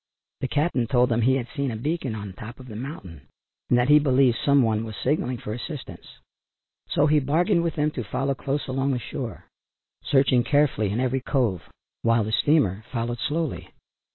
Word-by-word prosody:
The 130 - -2
"cap'n" 145 -4 0
told 125 0 +3
them 120 0 +1
he 130 +3 +3
had 125 -3 -2
seen 140 -2 -1
a 115 - -4
beacon 135 0 -2
on 105 -1 -6
the 95 - -8
top 110 +6 -10
of 130 - -11
the 110 - -9
mountain, 105 - -7 0.5
and 120 - +4
that 120 +1 +2
he 150 +1 +7
believed 130 -4 +3
some 140 -2 +4
one 110 -1 +1
was 110 -2 -7
signalling 130 -2 0
for 105 - -6
assistance. 135 +4 -8 0.7
So 145 - +3
he 150 0 +4
bargained 170 +7 +2
with 170 -2 -2
them 150 +1 +1
to 125 - -4
follow 135 +6 -1
close 140 +2 -3
along 135 +1 0
the - - 0
shore, 115 -2 -6 0.6
searching 135 -3 +3
carefully 135 -6 +2
in 105 +4 -1
every 130 +1 0
cove, 120 - 0 0.4
while 115 -1 +3
the 110 - -4
steamer 110 - +2
followed 120 -1 -2
slowly. 155 +3 -2
130 Hz, 195 wpm, -25 LUFS, 115-145 Hz, 0.7 s, he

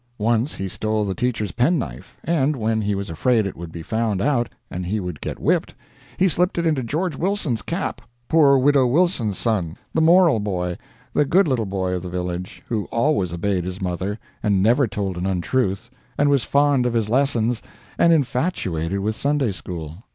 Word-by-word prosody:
Once 115 +5 +1
he 95 - -4
stole 110 +2 -1
the 95 - -1
teacher's 110 -4 -1
penknife, 120 - -1
and, 155 -3 +1
when 110 -2 0
he 105 -1 0
was 100 -3 -4
afraid 110 +6 +2
it 95 - -4
would 85 -1 -8
be 85 0 -7
found 110 0 -1
out 120 0 +1 0.2
and 90 0 -4
he 105 +4 -1
would 90 -5 -5
get - - -4
whipped, - - 0 0.4
he 190 - +4
slipped 180 +1 +1
it 170 - 0
into 155 -5 +2
George 155 +7 -2
Wilson's 170 - -1
cap - - -3 0.3
poor 145 -4 +5
Widow 135 -1 +4
Wilson's 125 - +2
son, 100 -7 -1 0.2
the 160 - +2
moral 170 -5 +5
boy, 90 -4 -2 0.4
the - - +3
good 175 +6 +3
little 120 -7 0
boy 95 -1 -1
of 90 - -2
the 90 - -6
village, 90 0 -4
who 110 -4 -1
always 115 - +1
obeyed 90 +2 -1
his 90 +1 -5
mother, 95 +2 -2 0.2
and 100 -3 +2
never 120 +5 +4
told 100 -4 -3
an 90 +2 -2
untruth, 100 +4 -1 0.3
and 145 0 +3
was 140 -4 +3
fond 140 -3 +3
of 120 - -1
his 115 -3 +1
lessons, 120 -2 +1 0.4
and 170 - +5
infatuated 125 - 0
with 110 +2 -1
Sunday 140 -4 +1
school. 85 -4 -7
110 Hz, 190 wpm, -22 LUFS, 95-140 Hz, 0.4 s, poor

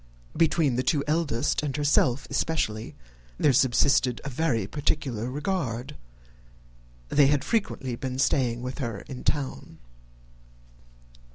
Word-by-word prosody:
Between 155 -5 +2
the - - +2
two 140 +1 +1
eldest 150 -4 0
and 150 -2 -3
herself 140 -3 +2
especially, 115 -7 -1 0.4
there 145 - +3
subsisted 125 -1 +3
a 140 - -4
very 125 -7 0
particular 130 -2 -2
regard. 145 -3 -3 1.1
They 145 -2 +5
had 145 -1 +2
frequently 165 - -1
been 130 +1 -4
staying 125 -3 +1
with 125 +3 -5
her 115 -7 -3
in 130 -2 -9
town. 140 -3 -2
135 Hz, 115 wpm, -26 LUFS, 120-150 Hz, 1.1 s, They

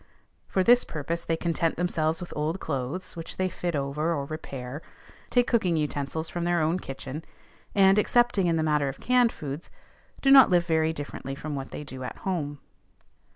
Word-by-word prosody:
For 190 - +1
this 245 +4 +6
purpose 165 +2 -4
they 165 - -1
content 165 -1 0
themselves 160 -2 0
with 180 - -7
old 155 +5 -1
clothes, 145 +6 -4
which 165 -1 -7
they 185 0 +1
fit 175 -1 -3
over 150 +4 -1
or 140 -2 -2
repair, 140 -2 -6 0.5
take 245 -1 +3
cooking 185 -10 +2
utensils 150 +1 -2
from 175 +1 -3
their 175 0 +2
own 160 +3 +1
kitchen, 135 +1 -7 0.5
and, 195 0 +6
excepting 240 -4 +3
in 165 - +2
the 160 - +1
matter 150 -3 +2
of 135 - -8
canned 250 -2 +3
foods, 145 +2 -6 0.5
do 270 - +3
not 270 -2 +9
live 175 -2 +3
very 160 -1 +2
differently 145 -3 -6
from 150 +2 -5
what 135 -1 -4
they - - -6
do 130 -2 -8
at 125 - -6
home. 150 -6 -2
160 Hz, 185 wpm, -27 LUFS, 145-180 Hz, 0.5 s, not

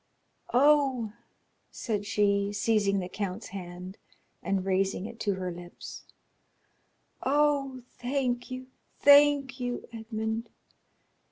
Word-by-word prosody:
"Oh," 265 -4 +4 0.6
said 205 -3 -3
she, 200 -1 +2
seizing 205 -2 +2
the 180 -2 -2
count's 195 +2 -4
hand 180 0 -8 0.4
and 195 -1 -1
raising 195 0 +1
it 230 +1 -8
to 200 -2 0
her 185 -1 -3
lips; 175 0 -9 1.2
"oh, 275 -2 +1 0.2
thank 245 -1 -1
you, 255 0 -6 0.3
thank 285 -2 +6
you, 245 -1 -3
Edmond! 220 0 -3
220 Hz, 100 wpm, -29 LUFS, 195-260 Hz, 1.2 s, thank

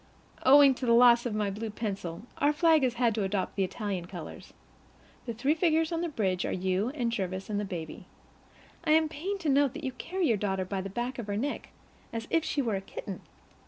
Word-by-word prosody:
Owing 275 +1 +7
to 255 0 -5
the 235 - +5
loss 240 0 +6
of 220 - -3
my 210 -2 0
blue 220 +3 -4
pencil, 200 -4 -5 0.2
our 290 - +4
flag 320 0 +4
has 250 -2 +1
had 235 -2 +2
to 210 -1 -1
adopt 190 0 -2
the 195 - +1
Italian 190 -2 -3
colors. 175 -4 -9 0.8
The 235 - -2
three 265 +7 +2
figures 325 -1 +2
on 330 0 -1
the 345 - -1
bridge 190 - -1
are - - -2
you 190 +4 0
and 240 -5 -1
Jervis 190 -2 -3
and 205 - 0
the 205 - -2
baby. 175 -2 -7 0.8
I 310 -2 +3
am 315 0 +4
pained 370 +6 -4
to 320 - 0
note 280 -1 +3
that 315 - -7
you 265 - -2
carry 360 +8 -3
your 225 - +2
daughter 190 -2 -1
by 190 +1 -3
the 195 - -5
back 240 +5 -4
of 225 - -5
her 205 0 -2
neck, 280 +6 -3 0.4
as 230 0 -5
if 330 - +3
she 285 - -1
were 225 -4 0
a - - -5
kitten. 195 0 -7
230 Hz, 230 wpm, -29 LUFS, 195-290 Hz, 0.8 s, Owing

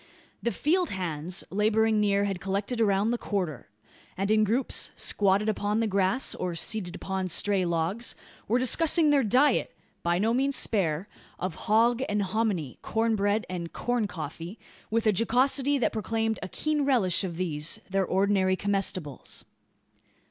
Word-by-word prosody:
The 235 - 0
"field 345 +7 +1
hands" 175 -1 -3
labouring 215 +2 +2
near 200 -1 +2
had 195 -3 -2
collected 200 +5 -2
around 205 +1 +2
the 240 - -1
"quarter;" 165 - -3 0.5
and 195 +2 0
in 215 0 +4
groups, 230 +6 +1
squatted 200 +1 +2
upon 210 0 0
the 230 - +1
grass, 200 +5 +1
or 180 -2 -4
seated 180 0 -2
upon 190 -1 -3
stray 190 +2 +2
logs, 170 +7 -1 0.3
were 230 - +2
discussing 305 +5 +3
their 280 -2 +4
diet 255 +7 +2 0.2
by 170 0 +1
no 220 +5 +1
means 275 +2 +1
spare 180 -4 +1 0.3
of 185 -1 -3 0.2
"hog 235 +3 +4
and 205 0 0
hominy" 190 - -2
corn 225 0 0
bread 205 +1 0
and 175 -2 -5
"corn 245 -3 -1
coffee," 165 +4 -7 0.3
with 230 +1 0
a 215 - +4
jocosity 265 +6 +2
that 250 - 0
proclaimed 225 0 -1
a - - -4
keen 305 - -1
relish 225 -10 +2
of 175 -3 -4
these, 160 -3 -1
their 195 0 0
ordinary 190 0 +2
comestibles. 185 -8 -3
205 Hz, 155 wpm, -27 LUFS, 185-230 Hz, 0.5 s, in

